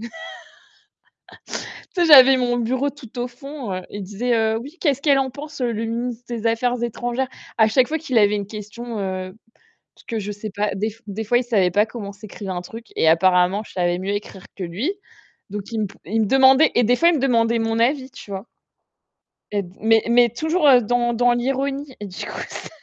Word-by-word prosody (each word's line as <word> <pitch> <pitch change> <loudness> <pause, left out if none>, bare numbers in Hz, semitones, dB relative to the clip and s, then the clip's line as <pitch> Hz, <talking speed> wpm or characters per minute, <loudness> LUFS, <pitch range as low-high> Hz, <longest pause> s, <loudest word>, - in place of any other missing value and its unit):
tu 235 - -7 1.9
sais, 350 - +3
j'avais 270 -4 +9
mon 245 -1 0
bureau 255 +4 0
tout 260 -4 -11
au 245 - -1
fond, 275 -2 -8
heu, 185 - -3
il 205 -1 -6
disait: 230 +5 -1
«Heu, 220 0 +1
oui, 290 +7 -11
qu'est-ce 280 -4 +1
qu'elle 280 -2 +4
en 265 -1 0
pense, 290 +2 -9
le 230 -2 -1
ministre 235 +1 -4
des 230 -2 -5
affaires 240 +2 +1
étrangères?» 240 +2 -2 0.3
À 220 -1 +5
chaque 250 +3 +3
fois 315 - -1
qu'il 265 -7 -2
avait 210 -1 +4
une 200 -1 -3
question, 215 +2 -7
heu, 185 -1 -4 0.6
parce - - -20
que 225 -2 -3
je 205 - -5
sais 210 +1 -6
pas, 205 +1 0
des 215 +2 -2
des 210 +2 -4
fois, 240 +3 +3
il 250 - -2
savait 200 -7 +2
pas 210 +4 +3
comment 210 -3 -7
s'écrivait 200 -1 -8
un 180 -1 -4
truc 225 +6 -10
et 160 - +3
apparemment, 180 +4 +3
je - - -14
savais 175 -1 0
mieux 195 +2 -3
écrire 205 -2 -6
que 195 - -7
lui. 200 - -2 0.6
Donc, 205 +1 -4
il 225 - -1
me 210 - 0 0.2
il 220 +7 -1
me 215 - +2
demandait 265 +4 +6
et 245 - +4
des 245 +3 +4
fois, 335 +7 +4
me 320 - +1
demandait 235 -3 +2
mon 225 0 0
avis, 260 +2 +1
tu - - -12
vois? 195 +2 -5 1.1
Mais 205 -1 0 0.2
mais 225 0 +4
mais 240 0 +6
toujours 315 +6 +1
dans 240 +2 +1
dans 245 +1 +3
l'ironie 270 +3 -2
et 205 - -5
du 185 -2 -7
coup, - - -6
ça - - -7
230 Hz, 210 wpm, -21 LUFS, 205-255 Hz, 1.9 s, j'avais